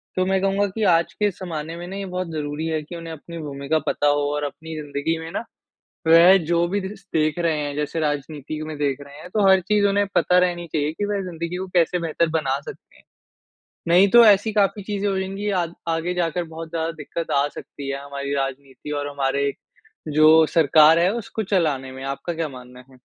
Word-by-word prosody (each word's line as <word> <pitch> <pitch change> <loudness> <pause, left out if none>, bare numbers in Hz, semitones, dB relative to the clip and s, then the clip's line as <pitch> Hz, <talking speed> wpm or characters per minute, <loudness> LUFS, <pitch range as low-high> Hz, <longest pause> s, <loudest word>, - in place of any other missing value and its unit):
तो 185 - +1
मैं 190 0 +1
कहूँगा 195 +1 +1
कि 215 +3 -4
आज 170 -4 +3
के 210 -1 +1
ज़माने 165 -3 -6
में 175 +1 -7
ना 190 - -7
ये 200 - -4
बहुत 185 -1 -4
ज़रूरी 150 0 -4
है 160 -1 -1
कि 170 +4 -9
उन्हें 165 -1 -7
अपनी 170 +2 -10
भूमिका 145 0 -2
पता 145 - +1
हो 145 0 +3
और 150 0 -2
अपनी 160 +3 -6
ज़िन्दगी 150 +2 -2
में 160 0 -7
ना - - -3 0.6
वह 170 +4 +8
जो 170 +1 +2
भी 205 +2 -1
दिस 195 +1 -8
देख 155 0 +1
रहे 165 -3 +1
हैं 145 -1 -3
जैसे 150 +2 -2
राजनीति 150 0 -3
में 155 -1 -6
देख 140 -2 -1
रहे 140 +1 -12
हैं 180 - -10
तो 210 -2 +3
हर 190 0 +6
चीज़ 205 +2 +2
उन्हें 200 0 +2
पता 180 - +4
रहनी 175 -1 +1
चाहिए 150 0 0
की 205 - -3
वह 205 -1 -1
ज़िन्दगी 170 +1 -4
को 190 - -4
कैसे 175 +1 +3
बेहतर 165 0 0
बना 135 -3 -1
सकते - - -12
हैं। - - -23 0.8
नहीं 180 +4 +6
तो 240 +2 +8
ऐसी 210 +1 +5
काफ़ी 205 -1 +1
चीज़े 205 0 -2
हो 195 -1 0
जाएँगी 195 +2 -3
आग 170 -1 -2
आगे 165 +2 -1
जाकर 175 0 -1
बहुत 160 0 -8
ज़्यादा 165 0 -2
दिक्कत 165 +1 -6
आ 140 +1 +3
सकती 140 -1 -8
है 140 +1 -4
हमारी 140 0 -4
राजनीति 135 +1 -5
और 145 - -4
हमारे 140 0 0 0.7
जो 155 +1 +7
सरकार 160 +1 +6
है 175 +3 +3
उसको 225 -1 -4
चलाने 155 -9 0
में। 130 0 -9
आपका 140 +5 -4
क्या 165 -1 -2
मानना 125 -1 -12
है? 130 - -18
165 Hz, 215 wpm, -22 LUFS, 145-185 Hz, 0.8 s, वह